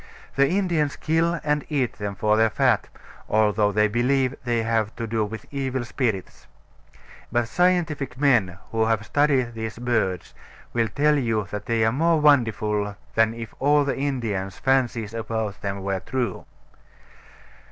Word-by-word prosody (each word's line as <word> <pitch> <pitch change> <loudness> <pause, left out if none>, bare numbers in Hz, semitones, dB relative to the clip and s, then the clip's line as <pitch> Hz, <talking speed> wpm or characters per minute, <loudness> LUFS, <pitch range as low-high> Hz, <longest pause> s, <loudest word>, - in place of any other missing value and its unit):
The 140 0 +4
Indians 170 -6 0
kill 165 +1 0
and 150 -1 0
eat 135 -7 -1
them 100 -1 -3
for 105 +2 +2
their 110 +1 +4
fat, - - +1 0.4
although 105 -1 +3
they 105 +1 +3
believe 130 +4 +1
they 120 -2 +1
have 110 -1 0
to 115 - -4
do 110 0 0
with 110 +1 -6
evil 130 -3 -2
spirits. 115 -7 -3 0.8
But 120 0 +1
scientific 160 -6 0
men 120 -11 +3
who 110 -1 +1
have 110 -2 0
studied 135 -2 +2
these 110 -1 -5
birds 110 -7 -1 0.4
will 115 -1 +1
tell 150 +6 +2
you 115 -5 0
that 105 -1 -5
they 115 -1 +2
are 110 - +3
more 165 +5 +2
wonderful 110 -8 +2 0.2
than 115 0 +2
if 115 -1 -7
all 145 +1 +3
the 140 - -1
Indians' 115 -9 -2
fancies 120 -5 0
about 110 -2 -3
them 100 -1 -4
were 95 -1 -1
true. 120 0 -3
115 Hz, 150 wpm, -24 LUFS, 105-140 Hz, 0.8 s, The